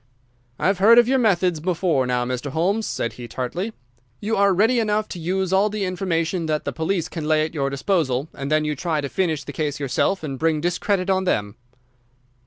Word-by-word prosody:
"I've 195 Hz, 0 st, +1 dB
heard 225 Hz, +4 st, +7 dB
of 240 Hz, -1 st, +7 dB
your 265 Hz, +1 st, +3 dB
methods 185 Hz, -7 st, +2 dB
before 165 Hz, -5 st, 0 dB
now, 125 Hz, -1 st, 0 dB
Mr. 125 Hz, +3 st, -3 dB
Holmes," 190 Hz, +9 st, 0 dB
said 115 Hz, -, -2 dB
he, 120 Hz, -1 st, -9 dB
tartly. 130 Hz, -, -3 dB, 0.5 s
"You 220 Hz, +2 st, -1 dB
are 200 Hz, 0 st, +4 dB
ready 220 Hz, +6 st, +3 dB
enough 215 Hz, -1 st, 0 dB
to 180 Hz, -, -6 dB
use 185 Hz, +2 st, -1 dB
all 200 Hz, +2 st, +4 dB
the 210 Hz, -1 st, -2 dB
information 175 Hz, -2 st, -1 dB
that 155 Hz, -1 st, -1 dB
the -, -, -2 dB
police 165 Hz, +1 st, -1 dB
can 160 Hz, -3 st, -5 dB
lay 155 Hz, 0 st, +3 dB
at 155 Hz, -, -7 dB
your 140 Hz, -3 st, -1 dB
disposal, 140 Hz, -2 st, 0 dB
and 140 Hz, 0 st, -5 dB
then 155 Hz, 0 st, +2 dB
you 150 Hz, 0 st, -1 dB
try 160 Hz, +1 st, -1 dB
to 140 Hz, -, -4 dB
finish 160 Hz, -5 st, -1 dB
the 145 Hz, -, -8 dB
case 145 Hz, 0 st, -2 dB
yourself 145 Hz, +7 st, 0 dB
and 135 Hz, -4 st, -5 dB
bring 160 Hz, -1 st, +1 dB
discredit 185 Hz, +3 st, 0 dB
on 190 Hz, 0 st, +1 dB
them." 105 Hz, -, -1 dB
170 Hz, 205 wpm, -22 LUFS, 145-195 Hz, 0.5 s, heard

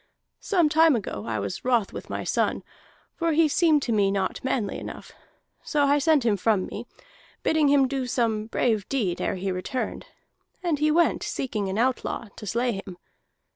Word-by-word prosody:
Some 350 Hz, -6 st, +2 dB
time 320 Hz, -1 st, +5 dB
ago 190 Hz, -, -4 dB
I 115 Hz, -1 st, -1 dB
was 100 Hz, -1 st, -4 dB
wroth 240 Hz, -5 st, +1 dB
with -, -, -8 dB
my -, -, -3 dB
son, -, -, 0 dB, 0.5 s
for 335 Hz, -1 st, 0 dB
he 320 Hz, +1 st, +4 dB
seemed 305 Hz, -1 st, +3 dB
to 240 Hz, -, -2 dB
me 205 Hz, -3 st, +3 dB
not 195 Hz, -1 st, -2 dB
manly 250 Hz, -6 st, -1 dB
enough. -, -, -9 dB, 0.5 s
So 295 Hz, -1 st, 0 dB
I 285 Hz, +1 st, +3 dB
sent 295 Hz, -3 st, +3 dB
him 210 Hz, -3 st, +3 dB
from 200 Hz, 0 st, +1 dB
me, -, -, -7 dB, 0.6 s
bidding 315 Hz, -2 st, +3 dB
him 280 Hz, -1 st, +4 dB
do 265 Hz, -1 st, -2 dB
some 225 Hz, -3 st, 0 dB
brave 225 Hz, -3 st, 0 dB
deed 205 Hz, -11 st, -1 dB
ere -, -, -1 dB
he 190 Hz, +1 st, -2 dB
returned. 185 Hz, +8 st, -4 dB, 0.6 s
And 330 Hz, -5 st, 0 dB
he 305 Hz, +1 st, +3 dB
went 335 Hz, +2 st, +3 dB
seeking 210 Hz, -7 st, -3 dB
an 190 Hz, -, -3 dB
outlaw, 240 Hz, -2 st, -1 dB
to 210 Hz, -, -8 dB
slay 235 Hz, -1 st, 0 dB
him. 185 Hz, -2 st, -10 dB
245 Hz, 180 wpm, -25 LUFS, 200-295 Hz, 0.6 s, time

